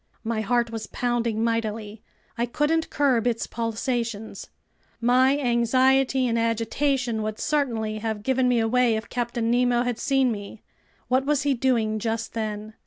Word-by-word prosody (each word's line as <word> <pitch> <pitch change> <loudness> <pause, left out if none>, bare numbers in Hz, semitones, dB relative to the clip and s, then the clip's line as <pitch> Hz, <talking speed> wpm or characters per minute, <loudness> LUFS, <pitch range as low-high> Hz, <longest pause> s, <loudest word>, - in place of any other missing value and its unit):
My 225 -1 -1
heart 235 +1 +1
was 220 -2 -5
pounding 235 -2 -1
mightily. 220 -2 -2 0.3
I 235 0 -1
couldn't 310 +6 0
curb 255 -5 +2
its 230 -2 0
pulsations. 230 -1 -3 0.5
My 255 +4 +4
anxiety 260 +1 +2
and 230 -1 0
agitation 230 +1 0
would 215 0 -3
certainly 230 -8 -1
have 220 -1 -3
given 260 +1 +2
me 250 -1 +3
away 235 +1 +2
if 220 +1 -5
Captain 235 -1 -1
Nemo 245 0 +2
had 245 -2 -2
seen 270 -4 +2
me. 205 0 -7 0.4
What 260 +1 +1
was 295 -1 +2
he 285 -1 +2
doing 230 -4 +1
just 225 +1 -3
then? 215 -1 -4
235 Hz, 150 wpm, -25 LUFS, 225-255 Hz, 0.5 s, My